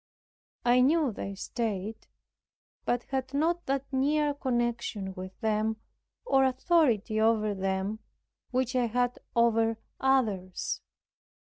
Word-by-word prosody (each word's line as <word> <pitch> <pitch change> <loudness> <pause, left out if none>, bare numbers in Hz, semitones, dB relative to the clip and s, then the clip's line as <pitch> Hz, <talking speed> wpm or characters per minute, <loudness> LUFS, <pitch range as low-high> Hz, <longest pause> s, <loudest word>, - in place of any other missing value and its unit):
I 245 +1 +5
knew 295 0 +3
their 195 -1 -5
state, 215 0 -3 0.8
but 245 0 0
had 265 0 -2
not 335 +4 +1
that 275 0 0
near 290 +2 +2
connection 240 -7 -2
with, 185 0 -7
or 220 - -1
authority 255 - +2
over 220 -2 +3
them, 190 +2 -2 0.5
which 255 0 0
I 245 -2 +3
had 245 +2 0 0.2
over 225 -1 +3 0.2
others. 215 -9 0
240 Hz, 105 wpm, -29 LUFS, 215-265 Hz, 0.8 s, I